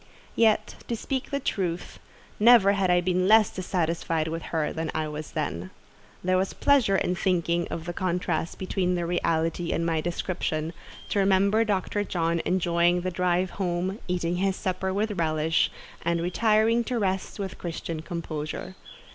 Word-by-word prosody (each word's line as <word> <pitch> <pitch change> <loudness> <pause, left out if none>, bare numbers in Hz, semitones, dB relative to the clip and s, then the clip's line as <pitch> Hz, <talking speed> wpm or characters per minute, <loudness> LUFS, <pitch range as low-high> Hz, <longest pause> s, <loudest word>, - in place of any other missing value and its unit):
Yet, 225 -2 +2
to 235 - -1
speak 265 +3 -3
the 280 - -1
truth, 180 -9 -3 0.4
never 220 -3 +7
had 195 -2 +1
I 175 0 +4
been 185 +1 +1
less 215 0 +6
dissatisfied 165 -3 -1
with 165 +1 -3
her 155 -2 -1
than 160 0 -3
I 155 -1 0
was 150 0 -7
then. 95 - -3 0.5
There 185 0 +2
was 190 - -1
pleasure 255 -9 +3
in 180 -1 +1
thinking 170 -2 0
of 165 -1 -5
the 175 - -4
contrast 180 -2 -1
between 185 -1 -1
the 175 -1 -1
reality 165 0 0
and 165 - 0
my 165 -2 +1
description—to 170 +1 -3
remember 200 +3 +4
Dr. 205 -1 -1
John 170 -3 0
enjoying 175 -1 +2
the 185 +1 -2
drive 180 +1 +1
home, 185 +2 -2
eating 175 -1 -1
his 195 +1 +1
supper 190 0 -2
with 205 0 -1
relish, 160 0 +2 0.3
and 170 0 0
retiring 220 +6 +2
to 245 - -1
rest 190 -3 -1
with 195 -2 -5
Christian 165 -2 -4
composure. 160 0 -5
180 Hz, 155 wpm, -26 LUFS, 165-195 Hz, 0.5 s, never